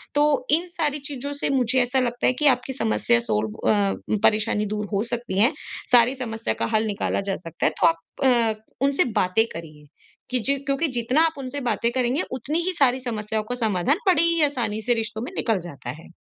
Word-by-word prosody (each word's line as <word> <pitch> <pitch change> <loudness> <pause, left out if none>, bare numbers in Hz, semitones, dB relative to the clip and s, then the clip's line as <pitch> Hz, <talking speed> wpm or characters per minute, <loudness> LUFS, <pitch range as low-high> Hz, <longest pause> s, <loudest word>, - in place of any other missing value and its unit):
तो 290 -3 +2
इन 335 +4 +8
सारी 300 -4 -2
चीज़ों 285 0 -6
से 285 - -2
मुझे 260 -1 +2
ऐसा 250 +2 +1
लगता 245 -1 0
है 255 - +3
कि 300 - +4
आपकी 260 0 +1
समस्या 235 0 +1
सॉल्व 110 - -1 0.2
अ, 200 -2 +2 0.3
परेशानी 210 0 +3
दूर 210 0 -3
हो 200 - +1
सकती 235 -5 -3
है 230 +7 +5 0.4
सारी 245 +1 +5
समस्या 230 -3 -3
का - - +2
हल 220 +1 +2
निकाला 200 -1 -2
जा 195 - 0
सकता 165 -3 -5
है। - - +3
तो - - +6
आप 165 0 +2 0.3
अ, 230 -4 +2 0.2
उनसे 280 0 +2 0.2
बातें 185 +5 +2
करिए 155 -3 -10 0.5
कि 255 - +2
ज 280 0 +2
क्योंकि 280 +4 +1
जितना 255 +7 +1
आप 325 - 0
उनसे 270 +1 -5
बातें 230 +2 0
करेंगे 255 +2 0
उतनी 295 +7 -1
ही 370 +1 0
सारी 265 -5 +2
समस्याओं 220 -3 -3
का 245 - -1
समाधान 215 - +1
बड़े 335 -3 +4
ही 335 -1 +3
आसानी 225 -6 -2
से 240 +2 +1
रिश्तों 220 -1 -3
में - - -6
निकल 220 -5 0
जाता 135 -6 -9
है। - - -15
240 Hz, 205 wpm, -23 LUFS, 215-275 Hz, 0.5 s, इन